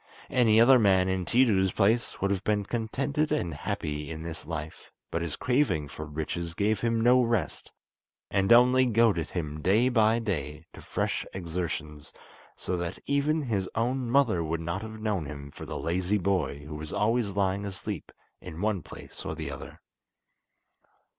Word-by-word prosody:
Any 115 -4 +4
other 125 +2 +7
man 95 -4 +4
in 95 -1 -1
Tiidu's 105 -6 +3
place 110 +4 +1
would 100 +1 0
have 100 -1 -1
been 105 -1 0
contented 135 +7 -1
and 85 - 0
happy 75 -4 -4
in 80 -1 -6
this 80 -2 -7
life; 80 -2 -6 0.2
but 85 - -1
his 85 -5 -3
craving 125 - +1
for 75 +2 -7
riches 80 +2 -4
gave 105 +2 +1
him 115 0 0
no 125 +2 +5
rest, 115 -8 -1 0.6
and 95 +2 +1
only 125 +2 +6
goaded 115 -8 +2
him 75 -3 -4
day 110 +9 +3
by 110 -2 +3
day 80 -8 -3
to - - -11
fresh - - -2
exertions, 80 -4 -4 0.5
so 90 - -3
that 85 +1 -4
even 145 +2 +1
his 100 -7 -1
own 125 +2 0
mother 115 -10 +3
would 80 +1 -2
not 85 +4 -3
have 110 0 -8
known 105 -8 -1
him 70 -1 -8
for - - -9
the - - -4
lazy 90 +4 0
boy 85 -7 -1
who 75 - -8
was 75 0 -7
always 105 0 0
lying 100 0 +1
asleep 100 -3 -6 0.3
in 85 -2 -8
one 105 -2 0
place - - -11
or - - -4
the - - -5
other. - - -9
100 Hz, 170 wpm, -28 LUFS, 85-115 Hz, 0.6 s, other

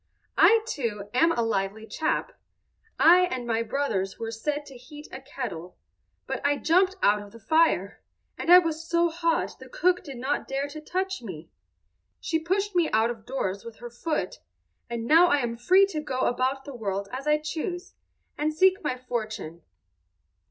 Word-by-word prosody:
"I, 450 +1 +7
too, 210 - -4
am 330 +7 +4
a 235 - 0
lively 215 0 -2
chap. 310 +7 -2 0.7
I 360 +2 +7
and 255 -6 -4
my 230 -1 0
brothers 220 -6 -2
were 225 0 -4
set 290 +6 -3
to 275 - -12
heat 295 +5 -12
a 260 - -8
kettle, 190 -11 -7 0.5
but - - -4
I 285 0 +2
jumped 370 +5 +3
out 205 +1 +4
of 205 0 -12
the 230 - -13
fire, 225 - +2 0.3
and 340 - -1
I 360 - +12
was 325 -2 +1
so 340 0 +3
hot 335 0 -1
the - - -12
cook 365 -8 +1
did 275 -7 -8
not 265 +4 -2
dare 275 +1 -2
to 310 +1 -8
touch 380 +2 -3
me. 170 -8 -9 0.7
She 320 - -1
pushed 385 +4 -1
me 345 -2 +3
out 220 +2 +2
of 225 -2 -10
doors 200 -7 -3
with 230 -1 -9
her 240 +1 -10
foot, 305 +7 -3 0.5
and 235 -1 -4
now 330 +7 +6
I 290 - +3
am 240 -4 -2
free 370 +12 +5
to 310 -5 -3
go 260 -4 -3
about 260 +2 0
the 280 - -8
world 200 -4 -3
as 265 +3 -6
I 300 0 +4
choose, 330 +4 -5 0.5
and 305 +1 +1
seek 375 +3 +3
my 255 -4 -1
fortune." 215 -9 -5
270 Hz, 180 wpm, -26 LUFS, 225-330 Hz, 0.7 s, I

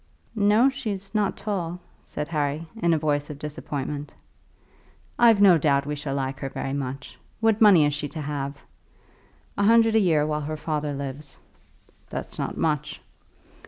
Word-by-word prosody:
"No; 215 +3 +4
she's 215 -8 -4
not 210 -2 0
tall," 180 -4 -3 0.2
said 150 - -5
Harry, 150 0 -1 0.2
in 170 - +3
a 165 - +3
voice 145 -1 -1
of 150 - -7
disappointment. 145 -1 -5 1.1
"I've 230 -3 +6
no 190 -5 +7
doubt 140 -1 +2
we 150 +1 -3
shall 145 -1 -4
like 135 0 -3
her 135 - -4
very 135 - -4
much. 140 0 -5 0.2
What 225 -1 +2
money 190 -8 +7
is 145 - +1
she 145 0 -3
to 160 - -6
have?" 140 -1 -4 1.0
"A - - +3
hundred 225 +1 +5
a - - +6
year 160 -7 +3
while 150 0 -1
her 155 +1 -4
father 150 -1 -2
lives." 140 +1 -7 0.7
"That's - - -6
not - - -3
much." 150 -2 -1
150 Hz, 160 wpm, -25 LUFS, 145-200 Hz, 1.1 s, no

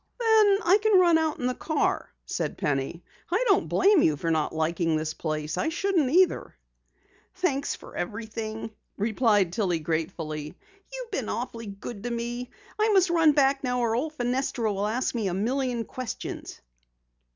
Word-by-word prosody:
"Then 435 -4 +5
I 380 +4 +5
can 425 -3 +5
run 340 -3 +5
out 315 -1 0
in 245 - -4
the 250 - +1
car," 310 +4 -1 0.2
said - - -3
Penny. 145 +4 -2 0.3
"I 390 +9 +1
don't 400 -2 +3
blame 395 -3 +4
you 150 -2 +3
for 165 +3 -1
not 155 -2 +1
liking 160 +1 0
this 155 0 -2
place. 155 -1 -3
I 320 - +1
shouldn't 340 -4 +1
either." 360 +5 +2 0.8
"Thanks 285 -7 0
for - - -13
everything," 220 +3 -5 0.3
replied 210 -4 +2
Tillie 185 -5 +1
gratefully. 155 0 -4 0.3
"You've - - -7
been - - -2
awfully 230 -1 -4
good 200 +2 -7
to 240 - -3
me. 240 +1 -4 0.3
I 430 +1 +3
must 380 -4 +4
run 325 -3 +5
back 275 -1 +3
now 250 -1 0
or 230 -2 +1
old 300 +6 -2
Fenestra 245 -3 -1
will 200 +1 -1
ask 240 +4 -1
me 225 -5 -1
a 180 - -1
million 245 +2 -1
questions." 255 -3 -6
240 Hz, 165 wpm, -26 LUFS, -, 0.8 s, Then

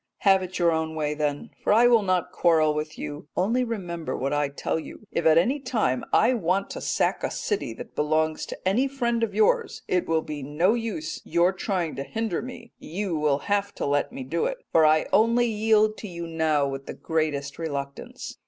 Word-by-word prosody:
Have 195 -2 +5
it 185 0 -5
your 170 -1 +3
own 160 0 -1
way 150 -1 -1
then, 150 +6 -2
for - - +2
I 225 +3 +6
will 240 -2 +6
not 185 -3 0
quarrel 160 -3 +3
with 155 +1 -4
you 145 0 -6
only 230 +8 +2
remember 175 - -4
what 135 +2 -1
I 145 -1 +1
tell 140 +3 -2
you: 185 - -10
if 170 - +1
at 160 0 +6
any 250 - +3
time 225 - 0
I 255 - +4
want 195 -3 0
to - - -6
sack - - 0
a - - 0
city 150 - -2
that - - -10
belongs 155 +1 0
to - - -6
any 240 +8 +3
friend 240 -4 -1
of 230 - -1
yours, 465 +2 +2
it 180 -1 0
will 160 -1 +1
be 150 -1 -6
no 150 +9 +2
use 220 -10 -4
your 175 +3 +2
trying 185 -4 -2
to 135 - -2
hinder 225 +1 -2
me, 240 -1 -9
you 180 +1 -3
will 150 -2 +2
have 200 0 0
to - - -3
let 145 +6 0
me 265 +1 -6
do 450 - -1
it, - - -3
for 160 -1 +5
I 155 0 +4
only 235 +2 +4
yield 215 -1 +2
to 215 - -7
you 170 -2 -6
now 160 -3 +1
with 135 0 -6
the - - -6
greatest 150 -3 -2
reluctance. 140 -4 -6
170 Hz, 210 wpm, -25 LUFS, 155-220 Hz, -, I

